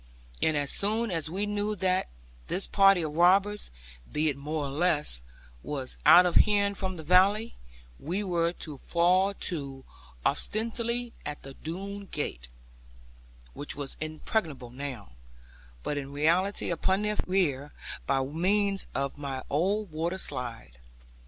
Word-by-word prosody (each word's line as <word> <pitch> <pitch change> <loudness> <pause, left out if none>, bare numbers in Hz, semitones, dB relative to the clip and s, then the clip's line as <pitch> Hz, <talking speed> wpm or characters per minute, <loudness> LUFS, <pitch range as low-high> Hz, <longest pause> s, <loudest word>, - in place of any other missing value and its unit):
And 155 -1 +3
as 145 -1 0
soon 220 +2 +1
as 160 -2 -1
we 195 +5 -1
knew 205 +1 -1
that 185 0 +1 0.4
this 195 - -1
party 195 -3 +5
of 150 -1 -4
robbers, 195 +4 +4 0.4
be 155 +1 +2
it 140 - -1
more 150 +2 -3
or 135 - -4
less, 150 - +1 0.4
was 135 - -4
out 180 +1 +10
of 175 - +1
hearing 200 -1 +5
from 190 -2 -3
the 160 - -7
valley, 195 +7 +4 0.5
we 185 +7 -2
were 170 -3 +1
to 150 -5 -7
fall 185 +3 +3
to, 140 -8 -3 0.4
ostensibly 235 +2 -1
at 150 - -6
the 135 - -8
Doone 195 +7 -6
gate 60 - -4 1.1
(which 145 - -5
was 140 -2 -5
impregnable 155 - -2
now), 130 - -6 0.7
but 145 - -1
in 140 0 -7
reality 175 +7 +1
upon 190 +4 +1
their 210 0 0
rear, 150 -7 +1 0.4
by 135 -1 +2
means 195 +7 +1
of 140 +1 -2
my 135 -2 -4
old 190 +6 +1
water 165 +4 -2
slide. 120 - -5
170 Hz, 140 wpm, -29 LUFS, 145-200 Hz, 1.1 s, out